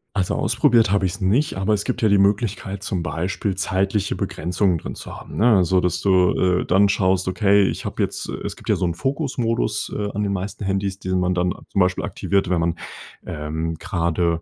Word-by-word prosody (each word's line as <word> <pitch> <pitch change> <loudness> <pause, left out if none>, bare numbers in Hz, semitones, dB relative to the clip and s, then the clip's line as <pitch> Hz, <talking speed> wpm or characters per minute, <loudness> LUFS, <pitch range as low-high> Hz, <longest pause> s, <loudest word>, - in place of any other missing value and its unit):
Also, 95 -3 0
ausprobiert 115 -3 +3
habe 100 -2 +2
ich's 95 +3 -3
nicht. 115 +11 +1
Aber 95 +3 +1
es 105 0 0
gibt 120 - -3
ja 110 - +4
die 100 - +5
Möglichkeit, 100 -1 0
zum 95 -5 -2
Beispiel 95 +3 -2
zeitliche 95 +1 0
Begrenzungen 90 0 0
drin - - -7
zu - - -9
haben, - - -10
ne? 110 -2 +5
Also, 90 0 +3
dass 90 -1 -1
du, 95 -2 +4 0.3
äh, - - -4
dann 100 +2 +4
schaust, 95 -2 +1
okay, 100 +1 +3
ich - - -5
habe - - -3
jetzt - - -2
äh, - - -4
es - - -4
gibt - - -12
ja - - +4
so 90 - -1
'n 85 -1 -1
Fokus-Modus, 125 - -1
äh, 105 -1 -2
an 105 +1 -1
den 100 -1 -1
meisten 100 +2 -4
Handys, 95 0 -1
den 95 -2 -1
man 90 0 +1
dann 90 0 +1 0.2
zum - - -1
Beispiel 90 0 +1
aktiviert, 100 -2 -1
wenn 90 -2 +2
man, 85 0 0 0.5
ähm, 80 +2 -3
gerade 85 -2 0
95 Hz, 210 wpm, -22 LUFS, 90-105 Hz, 0.5 s, die